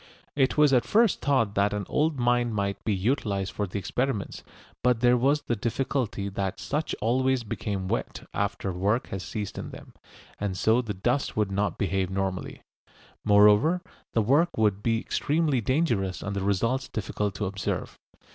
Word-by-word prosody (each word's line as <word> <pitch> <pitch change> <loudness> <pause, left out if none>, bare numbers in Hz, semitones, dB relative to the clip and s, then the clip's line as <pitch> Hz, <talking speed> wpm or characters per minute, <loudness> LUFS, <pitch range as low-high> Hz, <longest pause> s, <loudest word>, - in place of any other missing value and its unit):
It 135 0 +2
was 150 -2 +5
at 125 - +4
first 225 -1 +3
thought 130 -8 +2
that 100 0 +2
an 105 -1 -2
old 155 0 +1
mine 120 -1 +2
might 100 -2 -2
be 110 - 0
utilised 100 -2 -1
for 105 - -2
the 95 - -5
experiments, 110 +3 -2 0.4
but 125 -2 +2
there 125 0 +5
was 140 +5 +2
the 120 - -1
difficulty 115 -2 -2
that 95 -1 -3
such 150 +2 -2
always 130 +3 +1
become 100 -3 -3
wet - - -3
after 100 -1 -2
work 100 +7 0
has 95 - -4
ceased 105 +1 -5
in - - -6
them, - - -12 0.5
and 100 -2 -2
so 110 +5 +3
the 110 -4 -5
dust 120 +8 -1
would 105 -2 +1
not 100 -1 -1
behave 95 -2 0
normally. 95 -1 -3 0.6
Moreover, 105 - +5 0.3
the 115 - +2
work 150 +10 +2
would 105 -2 +2
be 115 +1 +1
extremely 150 0 0
dangerous 115 - 0
and 100 0 -3
the 100 - -1
results 115 +7 0
difficult 105 -2 -3
to 105 - -2
observe. 100 +1 -3
110 Hz, 170 wpm, -27 LUFS, 100-130 Hz, 0.6 s, was